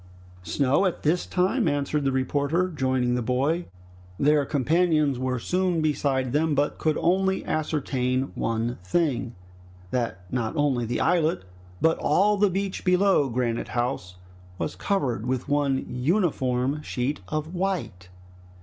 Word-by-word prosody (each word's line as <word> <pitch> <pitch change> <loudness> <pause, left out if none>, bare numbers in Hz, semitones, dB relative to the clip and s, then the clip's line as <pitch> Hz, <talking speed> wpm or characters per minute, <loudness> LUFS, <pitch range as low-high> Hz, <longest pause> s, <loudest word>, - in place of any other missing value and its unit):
"Snow 135 - +2
at 180 - -4
this 165 +4 +1
time?" 190 +5 +1
answered 145 0 0
the 135 - +2
reporter, 145 +7 0
joining 130 -5 0
the 125 - 0
boy. 135 +8 0 0.5
Their 145 +2 +3
companions 155 -1 +2
were 130 0 -1
soon 180 +6 0
beside 140 -4 0
them, 155 0 +2
but 145 +1 0
could 155 -1 +1
only 190 +2 +1
ascertain 135 -4 -1
one 115 +2 -2
thing, 125 - 0 0.6
that 115 -7 -2
not 120 0 -1
only 135 -6 +1
the 120 - -1
islet 165 - +2 0.4
but 160 0 +3
all 200 +8 +3
the 205 0 +3
beach 195 +1 -3
below 180 -5 +3
Granite 120 -1 -1
House 120 -7 -2 0.4
was - - -3
covered 125 - -1
with 130 -1 -2
one 140 -2 +1
uniform 135 -2 0
sheet 135 0 -2
of 155 - -3
white. 175 - -3
145 Hz, 135 wpm, -25 LUFS, 125-170 Hz, 0.6 s, Their